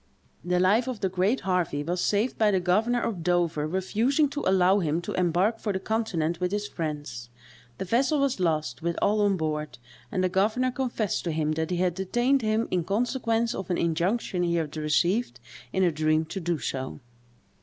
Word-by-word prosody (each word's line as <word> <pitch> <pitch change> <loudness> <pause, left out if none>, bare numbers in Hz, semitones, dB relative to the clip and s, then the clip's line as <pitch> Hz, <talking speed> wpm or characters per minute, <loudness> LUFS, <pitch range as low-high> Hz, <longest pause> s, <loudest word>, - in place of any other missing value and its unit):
The 180 +1 +1
life 210 +7 +3
of 250 -5 -4
the 190 - +1
great 190 +7 +1
Harvey 180 -6 0
was 175 +3 -2
saved 215 +5 +1
by 215 -1 +4
the 195 -2 +2
governor 215 +7 +1
of 195 -7 -2
Dover 170 -3 +1
refusing 225 - +1
to 290 +1 -4
allow 190 +1 +4
him 160 -2 0
to - - -4
embark 185 +5 +1
for 210 - -2
the 190 - -2
continent 185 -7 -1
with 180 0 -1
his 205 0 -2
friends. 145 -9 -5 0.5
The - - -4
vessel 265 - +2
was 275 -5 +1
lost, 155 -8 -1
with 170 +1 -2
all 210 +1 +2
on 200 -2 +2
board; 155 -2 -3 0.3
and 185 - 0
the - - +3
governor 215 +8 +1
confessed 245 -5 -2
to 170 - 0
him, 155 -1 0
that 160 +1 -2
he 180 - -1
had 180 -1 +1
detained 240 +9 +1
him 220 +1 0
in 180 -2 +1
consequence 230 +3 0
of 190 - -6
an 180 - +1
injunction 175 +4 0
he 170 -1 +1
had 160 -3 -2
received 170 +9 0 0.3
in 190 - +1
a 175 - +3
dream 155 +1 +1
to 190 - -5
do 175 -1 -1
so. 130 -1 -4
185 Hz, 195 wpm, -27 LUFS, 165-220 Hz, 0.5 s, by